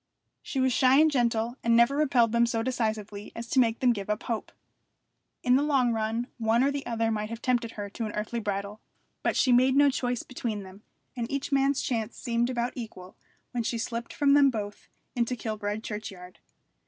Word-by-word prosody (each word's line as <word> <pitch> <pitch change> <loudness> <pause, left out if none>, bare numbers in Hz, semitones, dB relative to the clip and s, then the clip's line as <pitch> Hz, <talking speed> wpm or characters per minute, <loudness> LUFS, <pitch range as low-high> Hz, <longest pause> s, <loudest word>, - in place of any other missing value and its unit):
She 270 - -4
was 260 -1 +2
shy 260 +2 +5
and 315 0 +5
gentle, 235 -2 0
and 230 0 +3
never 235 +4 +5
repelled 260 -6 +3
them 235 0 +3
so 225 -1 -1
decisively 215 -4 -3
as 230 0 -6
to 265 - +3
make 230 -2 +2
them 250 -2 +4
give 200 -2 -6
up 210 +1 -1
hope. 230 -2 -3 0.9
In 250 +1 +4
the - - +2
long 270 -5 +2
run 225 +2 -1
one 225 +2 +3
or 280 - +3
the 280 -1 -3
other 230 -1 0
might 215 -1 -2
have 230 0 -6
tempted 240 -2 0
her 205 -1 -5
to 225 +1 -4
an - - -5
earthly 215 +3 -3
bridal; 200 0 -4 0.4
but - - 0
she 255 - +3
made 255 +2 +5
no 285 0 +5
choice 245 -2 -2
between 225 -5 -4
them; 190 +2 -13 0.3
and 235 -1 -3
each 280 +1 -3
man's 275 0 +2
chance 225 -2 -2
seemed 235 0 0
about 240 -1 -1
equal 200 -6 -8 0.4
when 245 - -1
she 230 +1 -2
slipped 230 +1 -4
from 280 -1 +3
them 285 -1 +6
both 205 -4 -5 0.3
into 240 0 0
Kilbride 215 -2 -4
churchyard. 195 -5 -7
235 Hz, 205 wpm, -28 LUFS, 220-255 Hz, 0.9 s, them